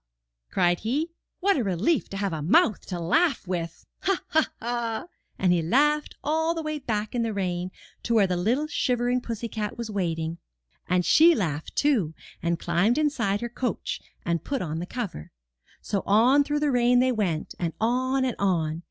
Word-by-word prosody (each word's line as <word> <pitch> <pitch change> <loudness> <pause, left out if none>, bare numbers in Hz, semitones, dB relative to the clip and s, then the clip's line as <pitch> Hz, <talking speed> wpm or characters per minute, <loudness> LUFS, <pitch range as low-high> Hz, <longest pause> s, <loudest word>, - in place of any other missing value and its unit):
cried 175 -2 +2
he. 290 +10 -1 0.3
"What 395 -2 +3
a 255 - +1
relief 205 - +1
to 195 - -5
have 195 -3 -1
a 155 - -3
mouth 185 +6 +3
to 180 -2 -4
laugh 290 - +1
with! 170 -2 -4
Ha, 390 -1 0
ha, 315 0 +3
ha!" 235 +2 -2 0.3
And 180 -2 +3
he 175 - +2
laughed 295 - +2
all 320 +2 +1
the 325 - -3
way 310 -1 -3
back 215 -5 -2
in 240 - 0
the 225 -2 -1
rain 180 -2 -2 0.3
to 235 - 0
where 210 -3 +5
the 180 -1 0
little 230 +12 +1
shivering 250 -4 0
pussy 230 -1 -4
cat 215 -2 -4
was 235 -2 -5
waiting. 165 -4 -2 0.5
And 180 -1 +2
she 330 +2 +6
laughed, 160 - -3
too, 220 - +2 0.3
and 170 0 0
climbed 175 - +1
inside 245 -10 +1
her 240 - -3
coach, 245 +2 -3 0.2
and 170 -2 0
put 275 -6 -2
on 160 -1 -3
the 175 - -5
cover. 200 - -5 0.5
So 200 - -1
on 245 +8 +5
through 295 +1 -1
the 295 -1 +2
rain 245 0 +4
they 255 +1 +4
went, 190 -9 -1
and 170 -2 -1
on 255 +3 +1
and 250 - -1
on. 165 -5 0
225 Hz, 185 wpm, -26 LUFS, 180-265 Hz, 0.5 s, she